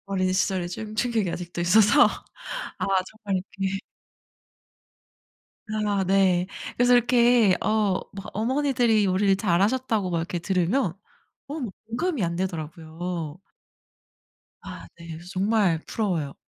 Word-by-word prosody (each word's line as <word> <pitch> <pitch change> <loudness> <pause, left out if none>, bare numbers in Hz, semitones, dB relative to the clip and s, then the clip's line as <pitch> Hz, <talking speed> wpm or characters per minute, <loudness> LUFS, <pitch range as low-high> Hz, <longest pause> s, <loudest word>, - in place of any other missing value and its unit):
어린 185 -1 0
시절에 185 -2 0
좀 215 +4 -6
충격이 220 -4 0
아직도 175 0 -5
있어서 210 +10 +6 0.7
아 - - -1 0.2
정말 200 -4 -3 0.2
이렇게 195 0 -1 1.9
아 210 -2 0
네. 185 -1 +3 0.3
그래서 245 0 +4
이렇게 240 -4 +4
어 210 -3 +1
뭐 195 -1 -8
"어머니들이 240 -2 +2
요리를 195 +1 +2
잘하셨다."고 205 +2 +1
막 170 - 0
이렇게 170 +1 -3
들으면 185 +3 0 0.5
어 300 +2 -5
뭐 235 -6 -3 0.2
공감이 245 - -1
안되더라고요. 165 -1 -4 1.2
아 - - -9
네. 170 0 -12
그래서 165 +2 -9
정말 195 -3 +1
부러워요. 170 -10 -2
195 Hz, 265 characters per minute, -25 LUFS, 175-220 Hz, 1.9 s, 있어서